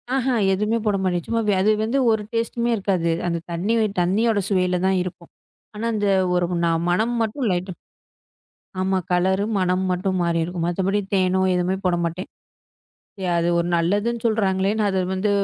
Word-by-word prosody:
அஹ 265 -1 0 0.3
எதுவுமே 210 +4 0
போட 210 -2 +2
மாட்டேன். 175 -3 -1
சும்மா 230 0 0 0.2
அது 210 +3 +4
வந்து 230 +5 0
ஒரு 220 -1 0
டெஸ்ட்டுமே 235 +1 -1
இருக்காது. 185 -4 0 0.2
அந்த 170 -1 0
தண்ணி 180 +7 -1
வே 220 - +3 0.2
தண்ணியோட 210 +5 +2
சுவையில 180 -2 +1
தான் 190 - +2
இருக்கும். 180 -1 -9 0.5
ஆனா 215 +2 -4
அந்த 205 -1 0 0.3
ஒரு 180 0 +2 0.2
நா 170 - +2 0.2
மனம் 220 +7 +1
மட்டும் 225 +4 -2
லைட்டா 180 +1 -2
இரு - - -24 1.1
ஆமா. 190 0 +1
கலரும், 190 +4 +1
மனமும் 185 +1 0
மட்டும் 185 +1 -1
மாறி 170 -1 +1
இருக்கும். 175 0 -4
மத்தபடி 195 +3 0
தேனோ, 185 -1 +2
எதுவோ 180 +1 0
போட 180 -1 +2
மாட்டேன். 170 +3 -5 0.9
எ - - -2
அது 170 0 +1
ஒரு 170 - 0
நல்லதுன்னு 205 +7 0
சொல்ல்றாங்களேன்னு 205 -1 +1
அது 190 -1 0
வந்து 190 +2 0
190 Hz, 165 wpm, -22 LUFS, 180-215 Hz, 1.1 s, அது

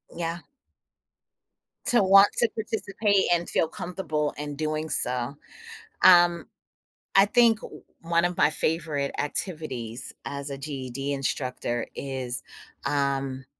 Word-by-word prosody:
Yeah. 170 0 -3 1.5
To 240 -4 +4
want 195 +1 +8
to 235 - +3
participate 205 -2 0
and 175 0 +1
feel 160 - +1
comfortable 155 -5 -3
in 145 0 -5
doing 155 +1 -2
so. 125 0 0 0.7
Um, 175 -3 +6 0.7
I 195 - +8
think 230 0 +4 0.4
one 170 +1 +1
of 175 0 -1
my - - +4
favorite 155 -3 -1
activities, 145 - -3
as 140 0 -5
a 140 - -4
GED 135 -1 -4
instructor 125 -3 -2
is, 130 -3 -4 0.4
um, 135 -2 -1
155 Hz, 110 wpm, -26 LUFS, 135-175 Hz, 1.5 s, want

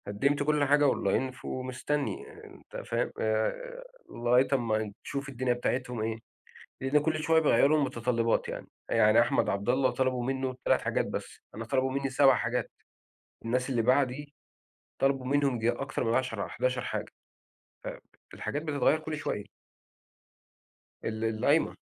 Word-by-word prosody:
قدمت 140 +8 +1
كل 150 0 +2
حاجة 145 +1 +4
online، 130 +6 -1
ومستني، 130 +3 -3
آآ، - - -14
أنت - - -12
فاهم - - -1
آآ، - - -1 0.3
لغاية 120 +2 +3
أمّا 110 -5 0
تشوف 140 0 -4
الدنيا 130 -1 0
بتاعتهم 125 -1 -2
إيه. 110 0 -2 0.6
لأن 135 +3 +3
كل 155 +1 0
شوية 160 0 +4
بيغيّروا 155 -1 +4
المتطلبات 120 -4 0
يعني. - - -6 0.2
يعني - - +5
أحمد - - +2
عبد 100 +2 -2
الله 130 +1 +3
طلبوا 130 0 0
منه 130 0 -2
3 - - +3
حاجات - - 0
بس. - - -6
أنا 115 - -5
طلبوا 130 +2 0
مني 135 0 -1
7 135 0 +5
حاجات. 120 +3 -1 0.7
الناس 125 +3 0
اللي 120 -3 +1
بعدي 135 +3 +1 0.6
طلبوا 135 -1 +1
منهم 140 0 +2
ييجي 115 0 +1
أكتر 135 +3 -3
من 115 - +1
10 120 -6 -1
حداشر 125 +1 -1
حاجة. - - -4 1.2
فالحاجات 145 - -4
بتتغيّر 150 -1 +2
كل 155 0 -5
شوية. 145 -8 -3 1.6
ال 110 0 -3
القايمة. 120 +8 +2
130 Hz, 140 wpm, -29 LUFS, 120-140 Hz, 1.6 s, يعني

